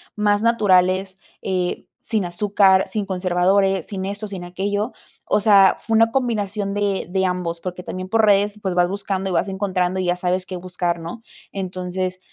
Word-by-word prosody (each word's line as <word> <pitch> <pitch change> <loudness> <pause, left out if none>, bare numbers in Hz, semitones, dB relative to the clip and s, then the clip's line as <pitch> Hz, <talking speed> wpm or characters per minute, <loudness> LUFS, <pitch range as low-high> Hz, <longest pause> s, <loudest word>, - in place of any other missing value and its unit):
más 205 -1 +2
naturales, 190 -4 +2 0.2
eh, 180 -2 -2 0.2
sin 215 -4 0
azúcar, 190 +1 +3
sin 205 +1 -2
conservadores, 190 +1 +1
sin 190 -2 -5
esto, 200 +2 -4
sin 190 -3 -7
aquello. 205 +5 -2 0.3
O - - +2
sea, 200 -2 +5
fue 225 - -1
una 225 0 +4
combinación 210 -5 -1
de 205 -1 -1
de 190 +1 +1
ambos, 180 -2 -2
porque 180 0 -6
también 185 0 -6
por 225 +1 +3
redes, 205 0 +2
pues, 190 -3 -2
vas 175 0 +3
buscando 195 -1 -2
y - - -2
vas 180 - +1
encontrando, 190 -2 -1
y - - -2
ya 175 0 +1
sabes 180 +1 -1
qué 185 -1 -6
buscar, 175 -1 -2
¿no? 170 +8 -8 0.3
Entonces, 185 -1 -4
190 Hz, 175 wpm, -21 LUFS, 180-205 Hz, 0.3 s, sea